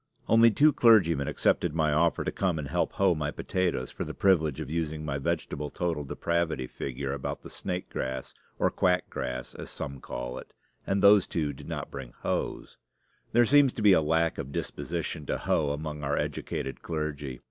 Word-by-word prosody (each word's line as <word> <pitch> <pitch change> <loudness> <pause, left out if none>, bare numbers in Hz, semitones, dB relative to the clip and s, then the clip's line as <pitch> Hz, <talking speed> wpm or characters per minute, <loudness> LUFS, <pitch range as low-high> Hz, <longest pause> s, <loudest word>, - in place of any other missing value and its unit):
Only 115 +1 +7
two 145 +7 +4
clergymen 85 - +5
accepted 85 -3 +1
my 80 -2 +2
offer 85 +2 +2
to - - -2
come 90 -4 0
and 75 -2 -4
help - - 0
hoe 95 -2 +3
my 75 -2 -2
potatoes 85 -5 -1
for - - -4
the - - -6
privilege 80 -7 +2
of 80 - -4
using 80 0 -3
my 70 -1 -2
vegetable 75 -1 -2
total 85 -3 -2
depravity 85 -1 -1
figure 65 +2 -4
about 70 - -4
the - - -10
snake 90 0 -4
grass, 65 0 -4 0.2
or - - +2
quack 90 0 +1
grass, 65 0 -4
as - - -8
some 70 -1 -6
call 60 0 -5
it; - - -14 0.3
and 100 0 +1
those 100 -1 +7
two 75 -4 -1
did - - -12
not - - -5
bring - - -7
hoes. - - -3 0.5
There 120 +1 +5
seems 140 +1 +5
to 110 - -4
be 100 -2 +8
a 80 - +5
lack 80 +2 +1
of 70 - -5
disposition 80 -1 -4
to - - 0
hoe 75 -2 +1
among 75 0 -4
our 70 0 0
educated 65 - -3
clergy. 75 -5 -4
80 Hz, 190 wpm, -28 LUFS, 70-90 Hz, 0.5 s, be